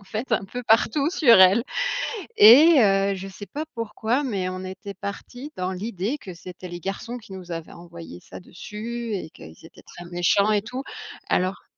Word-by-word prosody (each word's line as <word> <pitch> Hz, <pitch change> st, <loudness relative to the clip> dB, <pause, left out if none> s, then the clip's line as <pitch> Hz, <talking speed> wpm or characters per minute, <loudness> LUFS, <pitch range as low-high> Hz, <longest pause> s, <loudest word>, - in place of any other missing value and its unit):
en -, -, -18 dB
fait, 220 Hz, +5 st, -5 dB
un 210 Hz, -, +1 dB
peu 245 Hz, +6 st, -7 dB
partout 240 Hz, +7 st, +2 dB
sur 240 Hz, -, +6 dB
elle 190 Hz, +5 st, +6 dB, 0.8 s
et 280 Hz, +9 st, +8 dB
heu, 195 Hz, -1 st, +3 dB
je 190 Hz, +1 st, -7 dB
sais 195 Hz, +1 st, -10 dB
pas 300 Hz, +7 st, -6 dB
pourquoi 230 Hz, +4 st, -2 dB
mais 195 Hz, -8 st, -2 dB
on 185 Hz, 0 st, -6 dB
était 190 Hz, +2 st, -8 dB
parti 245 Hz, +8 st, -8 dB
dans 185 Hz, 0 st, -2 dB
l'idée 210 Hz, +6 st, -3 dB
que 190 Hz, -9 st, -10 dB
c'était 180 Hz, +1 st, -10 dB
les 175 Hz, 0 st, -7 dB
garçons 195 Hz, +7 st, -5 dB
qui 210 Hz, -4 st, -13 dB
nous 180 Hz, -2 st, -9 dB
avaient 165 Hz, -1 st, -6 dB
envoyé 170 Hz, -, -11 dB
ça -, -, -11 dB
dessus 220 Hz, +5 st, -7 dB
et 180 Hz, -5 st, -4 dB
qu'ils 80 Hz, 0 st, -14 dB
étaient -, -, -16 dB
très 175 Hz, -, -12 dB
méchants 175 Hz, +4 st, +2 dB
et 210 Hz, -1 st, +2 dB
tout, 250 Hz, +4 st, -6 dB, 0.5 s
alors 185 Hz, +2 st, 0 dB
200 Hz, 190 wpm, -24 LUFS, 185-235 Hz, 0.8 s, et